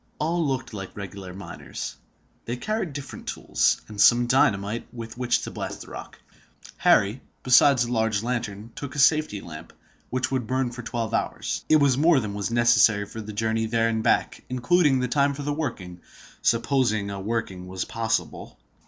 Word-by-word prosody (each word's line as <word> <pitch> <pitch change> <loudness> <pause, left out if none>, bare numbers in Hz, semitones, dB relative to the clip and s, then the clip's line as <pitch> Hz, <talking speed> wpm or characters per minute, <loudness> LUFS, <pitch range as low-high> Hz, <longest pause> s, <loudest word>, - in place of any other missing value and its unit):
All 165 +3 0
looked 135 -5 -2
like 95 -1 -7
regular 100 -2 -7
miners. 85 -8 -7 0.5
They 120 +2 -3
carried 215 - -2
different 140 -1 -8
tools, - - +1
and 105 -1 -3
some 120 0 +6
dynamite 110 -3 +1
with 115 -2 -8
which 125 0 0
to - - -5
blast - - -5
the - - -11
rock. - - -9 0.6
Harry, 105 +6 +3 0.2
besides 130 0 +6
a 120 - -5
large 110 -3 +1
lantern, 115 -3 -4
took 140 0 -7
a - - -6
safety 145 -7 +3
lamp, 80 -1 -10 0.4
which 130 +1 -1
would 130 -4 -1
burn 130 0 0
for 125 0 -7
twelve 115 -2 -3
hours. - - -2
It 155 - +6
was 140 -3 +4
more 160 -1 +5
than 105 -4 -4
was 100 +1 -3
necessary 115 -3 +4
for 110 +2 -8
the 110 0 -7
journey 110 +1 -1
there 115 0 +1
and 110 -1 -1
back, - - +1
including 135 +3 +3
the 125 - 0
time 140 +3 +2
for 145 - -6
the 145 +1 -1
working—supposing 115 - -2
a 100 - -5
working 95 -3 -3
was 95 0 -4
possible. 115 -1 -3
115 Hz, 175 wpm, -25 LUFS, 105-130 Hz, 0.6 s, some